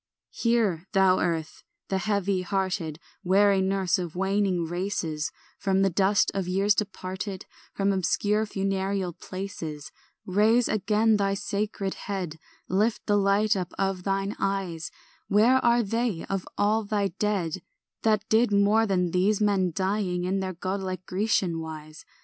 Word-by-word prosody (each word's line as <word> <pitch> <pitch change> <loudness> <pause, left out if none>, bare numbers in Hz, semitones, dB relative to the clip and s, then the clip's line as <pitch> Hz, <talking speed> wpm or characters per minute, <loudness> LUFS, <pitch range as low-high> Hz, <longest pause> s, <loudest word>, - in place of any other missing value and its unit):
ANT. - - -26
5 - - -7
Hear, 215 -7 +1
thou 190 -2 +4
earth, 165 -2 -2 0.3
the 190 - 0
heavy 200 -2 0
hearted 185 -4 -2 0.3
Weary 195 +1 +4
nurse 190 0 +1
of 175 -2 -5
waning 195 -2 +1
races; 170 -3 -2 0.3
From 195 -1 +2
the 195 - +2
dust 195 +2 +3
of 195 -2 -2
years 195 +3 +3
departed, 190 -1 -4 0.3
From 200 0 +1
obscure 205 +4 +1
funereal 195 -2 -1
places, 165 -6 -7 0.3
Raise 215 +5 +3
again 215 +1 +2
thy 195 -1 +1
sacred 200 -1 -2 0.2
head, 180 -6 -3 0.3
Lift 215 +4 0
the 205 - +2
light 205 +2 +3
up 180 -2 -3
of 195 -1 -1
thine 195 +1 -1
eyes 190 -5 -2 0.4
Where 235 +6 +4
are 235 0 +4
they 225 -3 -1
of 195 -2 -3
all 215 +2 +2
thy 205 -1 0
dead 190 -5 -1 0.4
That 215 -2 +1
did 225 0 +3
more 205 +2 +4
than 180 -3 +1
these 190 +4 +2
men 200 -4 +2
dying 190 0 -1
In 190 +2 0
their 190 -1 -3
godlike 185 0 -4
Grecian 185 -4 0
wise? 155 -1 -8
195 Hz, 145 wpm, -26 LUFS, 185-205 Hz, 0.4 s, thou